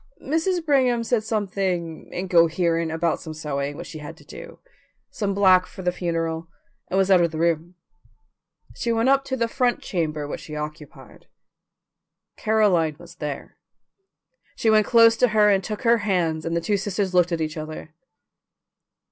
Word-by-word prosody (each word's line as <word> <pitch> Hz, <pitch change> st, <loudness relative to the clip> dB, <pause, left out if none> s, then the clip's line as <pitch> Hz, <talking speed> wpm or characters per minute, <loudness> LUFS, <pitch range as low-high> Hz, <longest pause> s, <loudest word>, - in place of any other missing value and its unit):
Mrs. 325 Hz, +4 st, 0 dB
Brigham 255 Hz, -5 st, +2 dB
said 230 Hz, -1 st, 0 dB
something 190 Hz, -6 st, -2 dB
incoherent 170 Hz, -2 st, +1 dB
about 165 Hz, 0 st, -1 dB
some 160 Hz, -1 st, -8 dB
sewing 145 Hz, -2 st, -3 dB
which -, -, -7 dB
she 160 Hz, -, -9 dB
had 150 Hz, -, -9 dB
to -, -, -18 dB
do, -, -, -11 dB, 0.5 s
some 200 Hz, -4 st, -2 dB
black 185 Hz, -2 st, +5 dB
for 190 Hz, -, -10 dB
the 180 Hz, -, +1 dB
funeral, 165 Hz, -2 st, -3 dB, 0.4 s
and 190 Hz, -, -1 dB
was 195 Hz, 0 st, +2 dB
out 185 Hz, -2 st, +6 dB
of 170 Hz, -, +2 dB
the 160 Hz, -, -7 dB
room. 170 Hz, +1 st, 0 dB, 1.0 s
She 235 Hz, -, -2 dB
went 230 Hz, +2 st, +2 dB
up 275 Hz, 0 st, +4 dB
to 260 Hz, -, -3 dB
the 230 Hz, -1 st, +1 dB
front 245 Hz, +1 st, 0 dB
chamber 155 Hz, -5 st, -2 dB
which -, -, -6 dB
she 155 Hz, -3 st, -8 dB
occupied. 150 Hz, 0 st, -9 dB, 1.1 s
Caroline 195 Hz, -8 st, +2 dB
was 175 Hz, +1 st, -14 dB
there. 150 Hz, -3 st, -6 dB, 1.0 s
She 220 Hz, -, +2 dB
went 215 Hz, -1 st, +4 dB
close 230 Hz, -1 st, +6 dB
to 250 Hz, -, +4 dB
her 210 Hz, -1 st, +6 dB
and 195 Hz, -1 st, +2 dB
took 215 Hz, +6 st, -5 dB
her 235 Hz, -1 st, +4 dB
hands, 175 Hz, -6 st, -1 dB
and 165 Hz, 0 st, -1 dB
the -, -, -1 dB
two 205 Hz, +4 st, 0 dB
sisters 195 Hz, -1 st, -2 dB
looked 180 Hz, 0 st, +3 dB
at 170 Hz, -, -1 dB
each 155 Hz, +1 st, -3 dB
other. 155 Hz, 0 st, -7 dB
180 Hz, 170 wpm, -23 LUFS, 160-220 Hz, 1.1 s, out